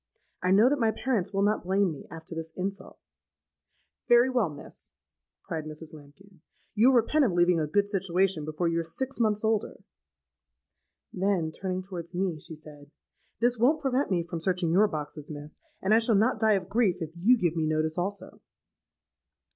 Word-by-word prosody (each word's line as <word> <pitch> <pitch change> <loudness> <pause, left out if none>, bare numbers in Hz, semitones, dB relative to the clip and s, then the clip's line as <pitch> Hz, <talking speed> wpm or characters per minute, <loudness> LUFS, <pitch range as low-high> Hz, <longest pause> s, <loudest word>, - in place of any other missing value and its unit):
I 180 - 0
know 205 +5 +6
that 285 +2 +1
my 225 -2 +3
parents 220 -5 -1
will 195 -1 0
not 210 +1 +1
blame 190 0 +1
me, 145 - -10
after 165 +1 -10
this 160 0 -6
insult.'—'Very 200 +5 -3
well, 240 -9 +1
miss,' 145 -1 -12 0.5
cried 160 -2 -5
Mrs. 155 +1 -9
Lambkin; 155 +5 -16 0.3
'you'll 235 +5 +5
repent 265 +6 +3
of 220 -9 +1
leaving 175 0 +3
a 155 - -1
good 200 +6 +1
situation 190 -3 0
before 155 +3 -2
you're 165 0 0
six 260 +12 -3
months 215 -2 +1
older.' 220 -1 -1 1.3
Then, 185 -4 0
turning 185 +2 -4
towards 175 -2 -8
me, 180 -3 -1
she 160 - -8
said, 150 -2 -14 0.5
'This 240 0 +2
won't 275 +7 +3
prevent 270 0 0
me 175 -3 +1
from 170 0 -6
searching 180 0 0
your 200 +5 +5
boxes, 150 -3 -6
miss; 150 0 -9 0.2
and 195 +3 +3
I 225 - +6
shall 225 -1 +2
not 220 +6 +2
die 220 -1 +4
of 190 -3 -1
grief 205 -6 +1
if 160 -3 -5
you 205 +9 +3
give 175 -6 0
me 160 -1 0
notice 155 0 0
also.' 195 +3 -5
185 Hz, 175 wpm, -28 LUFS, 160-215 Hz, 1.3 s, know